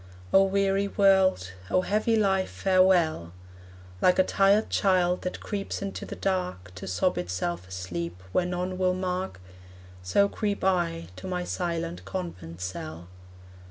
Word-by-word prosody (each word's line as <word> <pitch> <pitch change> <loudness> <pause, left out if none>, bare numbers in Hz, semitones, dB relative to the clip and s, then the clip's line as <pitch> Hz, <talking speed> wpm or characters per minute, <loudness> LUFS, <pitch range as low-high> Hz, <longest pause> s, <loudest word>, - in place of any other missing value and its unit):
O 195 - +8
weary 195 0 +2
world, 190 - +3 0.2
O 185 - +3
heavy 215 +4 +1
life, 195 -3 +2
farewell! 180 - +2 0.7
Like 180 - +4
a 185 - +6
tired 200 +3 +3
child 180 -3 +2
that 180 - -4
creeps 200 -1 -4
into 195 - -5
the - - -6
dark 180 - -2
To 90 - -8
sob 90 0 0
itself 90 0 -3
asleep, 90 -1 -5
where 175 - +1
none 180 +1 -3
will 185 -1 +2
mark, 185 - -3 0.6
So 90 - +3
creep 205 0 -2
I 170 - 0
to - - -7
my 180 -1 -2
silent 170 -1 -3
convent 95 - -6
cell. 85 -2 -6
180 Hz, 140 wpm, -27 LUFS, -, 0.7 s, O